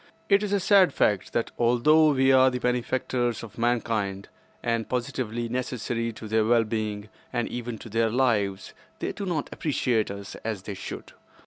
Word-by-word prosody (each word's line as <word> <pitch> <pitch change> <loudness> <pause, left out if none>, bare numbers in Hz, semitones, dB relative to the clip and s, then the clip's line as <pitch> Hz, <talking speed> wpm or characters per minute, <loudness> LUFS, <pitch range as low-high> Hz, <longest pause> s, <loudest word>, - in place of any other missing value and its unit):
It 200 0 +5
is 210 -2 -2
a 200 - +2
sad 190 -4 +4
fact 100 -3 +1
that 115 - -1
although 150 +7 +5
we 135 -2 +3
are 130 0 +6
the 125 - -3
benefactors 125 -1 -1
of 115 0 -10
mankind, 110 -5 -1 0.3
and 115 -2 -1
positively 120 -2 -2
necessary 120 -1 -2
to 110 0 -9
their 110 +1 +2
well 115 +1 +4
being 105 -1 -3 0.2
and 120 -2 -1
even 120 -1 -5
to 115 - -11
their 115 +1 +1
lives, 105 -6 0 0.2
they - - -3
do 200 - -5
not 160 -5 -1
appreciate 125 -7 0
us 100 0 -7
as 110 -4 -3
they 105 - -5
should. 95 - -8
120 Hz, 175 wpm, -26 LUFS, 110-130 Hz, 0.3 s, are